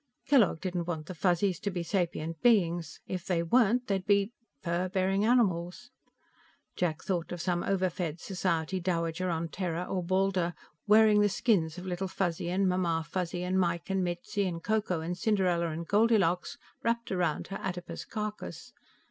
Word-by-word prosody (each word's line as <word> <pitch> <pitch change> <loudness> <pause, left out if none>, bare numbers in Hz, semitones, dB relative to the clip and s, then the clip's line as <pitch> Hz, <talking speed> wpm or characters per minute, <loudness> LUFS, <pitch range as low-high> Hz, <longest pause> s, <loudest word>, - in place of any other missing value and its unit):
Kellogg 230 - +4
didn't 175 -2 -2
want 160 -3 -3
the 185 - -6
Fuzzies 180 +1 +1
to 205 - -2
be 180 -3 -3
sapient 165 -3 -2
beings. 175 -9 +2
If 185 -1 -5
they 170 -3 +1
weren't 240 +6 +3
they'd 195 -4 -2
be... 200 +1 +3 0.3
fur 175 +2 -1
bearing 195 +2 +1
animals. 220 -1 +1 0.8
Jack 160 -3 -1
thought 175 -3 -2
of 175 - -4
some 175 0 0
overfed 180 -4 -1
society 185 -1 -1
dowager 170 0 -1
on 165 -1 -2
Terra 175 0 -2
or 185 0 -2
Baldur, 185 -1 +1 0.3
wearing 215 0 +6
the 205 - +4
skins 180 -5 +1
of 180 - -7
Little 185 +1 -2
Fuzzy 175 -3 -2
and 190 +2 +2
Mamma 170 -3 +1
Fuzzy 180 +1 -3
and 185 +1 +1
Mike 170 0 0
and 190 -1 +1
Mitzi 180 +3 -2
and 165 -2 -4
Ko 220 0 +2
Ko 180 -5 -2
and 170 +2 -3
Cinderella 180 -4 +1
and 165 +1 -5
Goldilocks 205 -5 +2 0.2
wrapped 235 0 -1
around 175 -5 -1
her 195 - -4
adipose 180 -2 -5
carcass. 215 -1 -6
180 Hz, 165 wpm, -30 LUFS, 170-195 Hz, 0.8 s, wearing